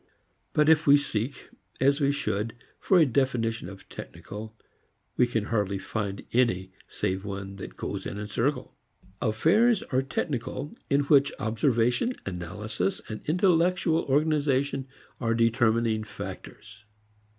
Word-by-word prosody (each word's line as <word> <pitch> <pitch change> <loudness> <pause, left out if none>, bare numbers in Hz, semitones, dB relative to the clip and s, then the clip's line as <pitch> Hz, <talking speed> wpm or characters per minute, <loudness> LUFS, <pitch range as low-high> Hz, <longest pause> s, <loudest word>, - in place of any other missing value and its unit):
But 150 0 +3
if 160 -1 +5
we 140 +1 +8
seek, 125 -1 -2 0.3
as 140 +3 +3
we 140 0 +3
should, 110 -5 -2 0.2
for 190 - +3
a 165 - +7
definition 120 -6 0
of 100 -1 -12
"technical," 110 +2 -9 0.6
we 125 - +4
can 115 -3 -1
hardly 105 -3 0
find 100 0 -4
any 95 -7 +2 0.2
save 95 +1 -2
one 100 -1 -6
that - - -9
goes - - -4
in - - -5
a 105 - -4
circle: 115 +8 -1 0.5
Affairs 190 - +3
are 130 - +4
technical 135 +1 -3 0.2
in 140 +1 +3
which 140 0 +4
observation, 120 - +1
analysis 95 +2 -3
and 110 - -5
intellectual 175 0 +3
organization 140 -2 +1 0.3
are 115 -2 +1
determining 115 -1 +2
factors. 110 0 -9
120 Hz, 130 wpm, -27 LUFS, 105-145 Hz, 0.6 s, we